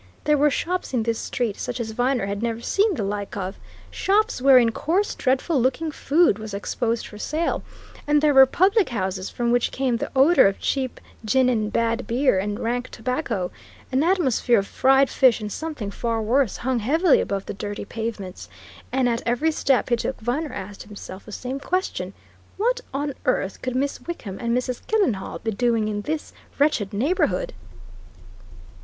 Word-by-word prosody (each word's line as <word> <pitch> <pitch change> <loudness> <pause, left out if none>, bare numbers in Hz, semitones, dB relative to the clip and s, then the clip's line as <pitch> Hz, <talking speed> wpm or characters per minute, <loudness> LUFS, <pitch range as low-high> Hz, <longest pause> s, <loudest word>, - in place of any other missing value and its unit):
There 300 - +3
were 295 +1 +4
shops 350 0 -2
in 230 - +1
this 230 0 -1
street 235 -6 -2
such - - -4
as 225 -2 -3
Viner 245 0 0
had 200 +1 -3
never 230 -1 -1
seen 395 - +1
the 220 - -2
like 200 0 -4
of 190 0 -4 0.3
shops 425 - +1
wherein 255 -3 +6
coarse, 360 - 0
dreadful 265 +2 +1
looking 270 +6 0
food 295 - +2
was 215 -2 -6
exposed 230 +3 -2
for 210 - -11
sale; 315 +8 -1 0.5
and 295 0 +4
there 300 0 +3
were 265 -1 +8
public 390 - +3
houses 190 -4 -3
from 235 -1 -1
which 245 0 +2
came 255 -3 0
the - - -4
odour 275 - +6
of 195 - -1
cheap 265 -2 -2 0.2
gin 255 +4 +3
and 215 -3 0
bad 230 +2 0
beer 250 -4 +2
and 205 +2 -3
rank 245 +2 -2
tobacco; 225 - -2 0.4
an 260 +1 +2
atmosphere 290 - +2
of 195 - +1
fried 270 +5 +4
fish 255 -4 +4
and 210 -1 -5
something 295 -10 -5
far 230 +1 -2
worse 235 +1 +1
hung 255 0 -1
heavily 310 - +3
above 200 -1 -3
the - - -5
dirty 205 +1 -5
pavements, 215 -4 -6 0.4
and 260 -1 +2
at 235 -1 0
every 245 +7 +2
step 275 -4 +1
he 240 - +4
took 240 - -3
Viner 270 +7 -2
asked 200 +1 -7
himself 200 -2 -10
the - - -9
same 255 +5 -4
question 370 +6 -2 0.4
what - - +1
on 285 +1 -2
earth 195 -6 0
could 255 -1 -3
Miss 275 +2 -1
Wickham 210 - -6
and 235 0 0
Mrs. 250 -1 -3
Killenhall 370 - 0
be 225 - -1
doing 230 0 +1
in 205 -1 -2
this 305 +7 -4 0.2
wretched 280 -9 +2
neighbourhood? 270 - 0
245 Hz, 180 wpm, -23 LUFS, 215-285 Hz, 0.5 s, were